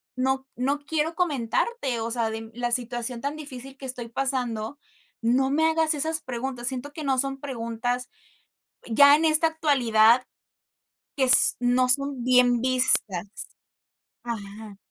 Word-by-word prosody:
no 265 Hz, +1 st, -2 dB
no 275 Hz, +4 st, -2 dB
quiero 310 Hz, +2 st, -3 dB
comentarte, 285 Hz, -, -3 dB
o 225 Hz, +1 st, -4 dB
sea, 230 Hz, -1 st, -2 dB
de 225 Hz, 0 st, -8 dB
la 240 Hz, 0 st, -4 dB
situación 240 Hz, 0 st, -1 dB
tan 280 Hz, +3 st, -4 dB
difícil 270 Hz, -3 st, -10 dB
que 275 Hz, -, -11 dB
estoy 250 Hz, -2 st, -4 dB
pasando, 245 Hz, -1 st, -2 dB, 0.4 s
no 250 Hz, +4 st, 0 dB
me 320 Hz, +2 st, +1 dB
hagas 320 Hz, -1 st, +3 dB
esas 315 Hz, +2 st, -2 dB
preguntas. 245 Hz, -1 st, -4 dB
Siento 265 Hz, +3 st, -2 dB
que 310 Hz, -, -8 dB
no 270 Hz, -2 st, -1 dB
son 275 Hz, 0 st, 0 dB
preguntas, 245 Hz, -2 st, -5 dB, 0.8 s
ya 285 Hz, +5 st, +5 dB
en 315 Hz, -, -2 dB
esta 315 Hz, +1 st, +4 dB
actualidad, 250 Hz, -7 st, +2 dB, 0.9 s
que 270 Hz, -, +1 dB
s 260 Hz, 0 st, +8 dB
no 250 Hz, +1 st, 0 dB
son 275 Hz, 0 st, +1 dB
bien 250 Hz, -1 st, +2 dB
vistas. 235 Hz, -7 st, +3 dB, 0.8 s
Ajá. 210 Hz, -2 st, -9 dB
255 Hz, 140 wpm, -23 LUFS, 235-285 Hz, 0.9 s, s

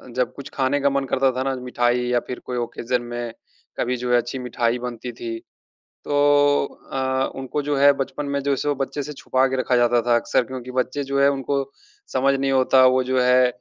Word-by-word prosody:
जब 125 Hz, -2 st, 0 dB
कुछ 140 Hz, 0 st, -9 dB
खाने 135 Hz, +1 st, +1 dB
का 140 Hz, -, +3 dB
मन 140 Hz, 0 st, -1 dB
करता 135 Hz, 0 st, +2 dB
था 130 Hz, +1 st, -2 dB
ना 135 Hz, 0 st, -1 dB
मिठाई 125 Hz, -1 st, 0 dB
या 125 Hz, 0 st, +2 dB
फिर 125 Hz, -, -5 dB
कोई 125 Hz, -, -4 dB
ऑकेज़न 120 Hz, +1 st, -2 dB
में 120 Hz, -1 st, -5 dB, 0.5 s
कभी 125 Hz, +1 st, 0 dB
जो 125 Hz, 0 st, -3 dB
है 120 Hz, -, +5 dB
अच्छी 120 Hz, +2 st, -3 dB
मिठाई 120 Hz, -1 st, -1 dB
बनती 120 Hz, 0 st, -6 dB
थी। 115 Hz, 0 st, -6 dB, 0.5 s
तो 145 Hz, 0 st, +2 dB, 0.3 s
अ, 130 Hz, 0 st, 0 dB
उनको 135 Hz, +2 st, -3 dB
जो 145 Hz, 0 st, -1 dB
है 140 Hz, +1 st, +7 dB
बचपन 145 Hz, +2 st, -6 dB
में -, -, +1 dB
जो 140 Hz, 0 st, +1 dB
सो 145 Hz, +2 st, -1 dB
बच्चे 140 Hz, +1 st, -3 dB
से 150 Hz, +2 st, -7 dB
छुपा 130 Hz, -1 st, +1 dB
के 130 Hz, -, -2 dB
रखा 125 Hz, -, +1 dB
जाता 120 Hz, 0 st, +3 dB
था 120 Hz, -, +4 dB
अक्सर 120 Hz, -, +1 dB
क्योंकि 125 Hz, 0 st, -7 dB
बच्चे 130 Hz, +3 st, -1 dB
जो 140 Hz, 0 st, -1 dB
है 140 Hz, -, +6 dB
उनको 140 Hz, 0 st, -1 dB, 0.5 s
समझ 135 Hz, +1 st, +3 dB
नहीं 135 Hz, 0 st, 0 dB
होता 130 Hz, 0 st, +5 dB
वो 130 Hz, -, +2 dB
जो 130 Hz, 0 st, 0 dB
है 125 Hz, 0 st, +5 dB
130 Hz, 215 wpm, -22 LUFS, 125-140 Hz, 0.5 s, है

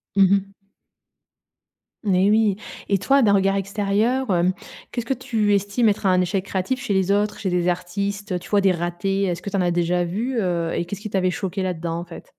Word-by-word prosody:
Mmh 195 Hz, -1 st, +5 dB
mh. 200 Hz, -1 st, +3 dB, 1.6 s
Et 195 Hz, -1 st, +3 dB
oui. 215 Hz, -2 st, +3 dB, 0.3 s
Et 200 Hz, -, +2 dB
toi 275 Hz, +7 st, +3 dB
d'un 200 Hz, -2 st, +4 dB
regard 195 Hz, 0 st, +3 dB
extérieur, 205 Hz, +6 st, 0 dB
hem, 180 Hz, 0 st, +2 dB, 0.4 s
qu'est 240 Hz, -, -2 dB
ce -, -, -11 dB
que 270 Hz, -, +2 dB
tu 220 Hz, -5 st, 0 dB
estimes 205 Hz, +4 st, +2 dB
être 205 Hz, 0 st, -2 dB
un 185 Hz, -1 st, +4 dB
échec 185 Hz, +1 st, -1 dB
créatif 195 Hz, +8 st, -2 dB
chez 245 Hz, -6 st, -2 dB
les 190 Hz, 0 st, +2 dB
autres, 205 Hz, +1 st, +1 dB
chez 195 Hz, -, -2 dB
des 180 Hz, 0 st, 0 dB
artistes, 195 Hz, +3 st, -2 dB
heu, 180 Hz, -, -1 dB
tu 175 Hz, -, -13 dB
vois 205 Hz, -1 st, +3 dB
des 190 Hz, -1 st, +4 dB
ratés? 175 Hz, +3 st, -1 dB
Est 180 Hz, -3 st, 0 dB
ce -, -, -11 dB
que 200 Hz, -, -5 dB
tu 195 Hz, -, -2 dB
en 185 Hz, -, +2 dB
as 175 Hz, -1 st, +1 dB
déjà 175 Hz, +1 st, +1 dB
vus, 225 Hz, +9 st, -2 dB
heu 170 Hz, -4 st, -1 dB
et 170 Hz, -, -1 dB
qu'est 190 Hz, -, -5 dB
ce 200 Hz, -, -13 dB
qui 215 Hz, -, -6 dB
t'avait 185 Hz, -2 st, +1 dB
choqué 190 Hz, +1 st, -3 dB
là-dedans 170 Hz, -2 st, -3 dB
en -, -, -5 dB
fait? 175 Hz, -, -11 dB
195 Hz, 230 wpm, -22 LUFS, 180-205 Hz, 1.6 s, Mmh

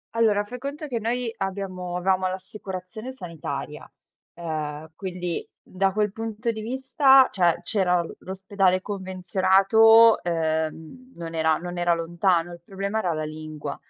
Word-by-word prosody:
Allora, 210 Hz, -3 st, +3 dB
fai 245 Hz, +4 st, -8 dB
conto 285 Hz, +3 st, -5 dB
che 245 Hz, -5 st, -3 dB
noi 230 Hz, +1 st, -2 dB
abbiamo 185 Hz, -2 st, -4 dB
avevamo 185 Hz, +1 st, +1 dB
l'assicurazione 190 Hz, +4 st, -7 dB
sanitaria, 150 Hz, -, -7 dB, 0.4 s
ehm, 155 Hz, -2 st, -5 dB
quindi 180 Hz, -3 st, -4 dB
da 190 Hz, +1 st, -1 dB
quel 210 Hz, 0 st, 0 dB
punto 225 Hz, +1 st, -3 dB
di 220 Hz, -1 st, -6 dB
vista, 265 Hz, +2 st, +4 dB
cioè 175 Hz, -3 st, +2 dB
c'era 180 Hz, -2 st, +1 dB
l -, -, -9 dB
l'ospedale 190 Hz, 0 st, 0 dB
convenzionato, 195 Hz, +4 st, +4 dB
ehm, 160 Hz, +8 st, -3 dB
non 165 Hz, -1 st, -7 dB
era 160 Hz, -1 st, +2 dB
non 175 Hz, 0 st, -6 dB
era 175 Hz, -1 st, +3 dB
lontano. 170 Hz, +1 st, 0 dB
Il 170 Hz, -, -12 dB
problema 200 Hz, +3 st, -3 dB
era 175 Hz, -5 st, 0 dB
la 155 Hz, -, -3 dB
lingua. 155 Hz, -2 st, -6 dB
185 Hz, 140 wpm, -25 LUFS, 170-215 Hz, 0.4 s, vista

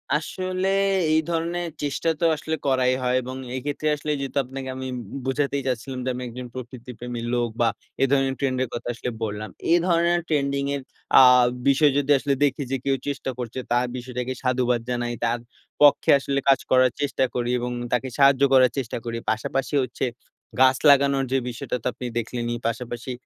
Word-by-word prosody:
আসলে 185 Hz, +4 st, -2 dB, 0.5 s
এই 160 Hz, -, +5 dB
ধরনের 170 Hz, +1 st, -1 dB
চেষ্টা 145 Hz, +3 st, -1 dB
তো 170 Hz, -, +1 dB
আসলে 160 Hz, +1 st, -3 dB
করাই 130 Hz, -1 st, +3 dB
হয়। 125 Hz, 0 st, +1 dB
এবং 130 Hz, +1 st, -7 dB, 0.2 s
এক্ষেত্রে 145 Hz, +3 st, -3 dB
আসলে 150 Hz, +1 st, -4 dB
যেহেতু 135 Hz, +1 st, -4 dB
আপনাকে 135 Hz, +1 st, -7 dB
আমি 130 Hz, 0 st, -5 dB, 0.2 s
বো -, -, -5 dB
বোঝাতেই 140 Hz, 0 st, -1 dB
চাচ্ছিলাম 130 Hz, +1 st, -3 dB
যে, -, -, 0 dB
আমি 125 Hz, -, -5 dB
একজন 125 Hz, +1 st, -7 dB
প্রকৃতিপ্রেমী 120 Hz, -1 st, -7 dB
লোক, 120 Hz, -1 st, +1 dB
বা 115 Hz, -, +4 dB, 0.4 s
এ -, -, +6 dB
ধরনের 135 Hz, -1 st, +2 dB
ট্রেন্ডের 130 Hz, -2 st, 0 dB
কথা 120 Hz, -, -5 dB
আসলে 120 Hz, +1 st, -4 dB
বললাম। 105 Hz, 0 st, -4 dB, 0.2 s
এ -, -, +7 dB
ধরনের 170 Hz, 0 st, +2 dB
ট্রেন্ডিং 140 Hz, -2 st, 0 dB
এর 140 Hz, -, -4 dB, 0.4 s
আ -, -, +10 dB, 0.5 s
বিষয় 140 Hz, +1 st, +5 dB
যদি 145 Hz, 0 st, +1 dB
আসলে 140 Hz, +1 st, 0 dB
দেখি, 140 Hz, 0 st, +1 dB
যে 135 Hz, -, +1 dB
কেউ 135 Hz, -1 st, +2 dB
চেষ্টা 135 Hz, -2 st, -3 dB
করছে। 125 Hz, +1 st, -5 dB
তার 120 Hz, +1 st, +3 dB
বিষয়টাকে 125 Hz, 0 st, -4 dB
সাধুবাদ 125 Hz, -2 st, +1 dB
জানাই, 120 Hz, -1 st, -1 dB
তার 115 Hz, +1 st, 0 dB, 0.4 s
পক্ষে 145 Hz, -1 st, +5 dB
আসলে 140 Hz, 0 st, -1 dB
কাজ 135 Hz, -, +5 dB
করার 130 Hz, -1 st, +5 dB
চেষ্টা 140 Hz, -2 st, +1 dB
করি, 120 Hz, -1 st, -1 dB
এবং 125 Hz, 0 st, -3 dB, 0.2 s
তাকে 125 Hz, +2 st, +1 dB
সাহায্য 140 Hz, -1 st, +5 dB
করার 130 Hz, -2 st, +6 dB
চেষ্টা 130 Hz, -4 st, -3 dB
করি। 115 Hz, 0 st, -3 dB
পাশাপাশি 135 Hz, +6 st, -2 dB
হচ্ছে 125 Hz, +1 st, -3 dB, 0.5 s
গাছ 130 Hz, 0 st, +6 dB
লাগানোর 140 Hz, -1 st, +4 dB
যে 135 Hz, -, +3 dB
বিষয়টা, 120 Hz, +1 st, -4 dB
তো -, -, -1 dB
আপনি 125 Hz, -, -7 dB
দেখলেনই। 120 Hz, +1 st, -2 dB
পাশাপাশি 120 Hz, +2 st, -4 dB
130 Hz, 180 wpm, -24 LUFS, 125-140 Hz, 0.5 s, আ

